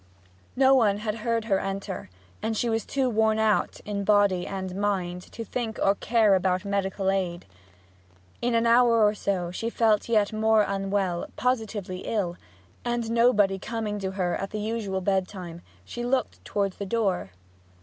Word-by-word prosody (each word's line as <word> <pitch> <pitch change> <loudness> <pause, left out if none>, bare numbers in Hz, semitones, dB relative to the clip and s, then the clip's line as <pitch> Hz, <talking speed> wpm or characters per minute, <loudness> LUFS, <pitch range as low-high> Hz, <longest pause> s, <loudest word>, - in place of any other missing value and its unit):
No 265 +1 +5
one 215 -6 +4
had 210 0 -2
heard 230 0 -1
her 195 -4 +2
enter, 195 - -5 0.3
and 220 +1 -1
she 235 +1 0
was 225 0 -1
too 270 -2 0
worn 220 -2 +2
out, 220 -1 +1
in 205 -1 -3
body 200 -3 +3
and 190 -2 -5
mind, 190 -3 -1
to 230 - -6
think 225 -1 -3
or 195 - +4
care 220 0 +3
about 185 +1 +1
medical 195 -1 0
aid. 180 -3 -2 1.0
In 240 0 +1
an 230 0 +2
hour 235 -1 +5
or 210 - +3
so 190 -4 -2
she 225 +5 -3
felt 225 -2 +2
yet 215 -2 +2
more 220 0 +3
unwell, 195 -3 -1
positively 220 -7 -2
ill; 185 -4 -2 0.5
and 240 -2 -2
nobody 210 -5 +3
coming 215 -1 -3
to 190 -1 -3
her 180 -2 0
at 195 - -4
the 215 - -4
usual 210 -3 -2
bedtime, 185 -3 -2 0.2
she 240 - -6
looked 255 +2 -1
towards 200 -2 -2
the 200 - -4
door. 195 - 0
205 Hz, 165 wpm, -26 LUFS, 195-225 Hz, 1.0 s, No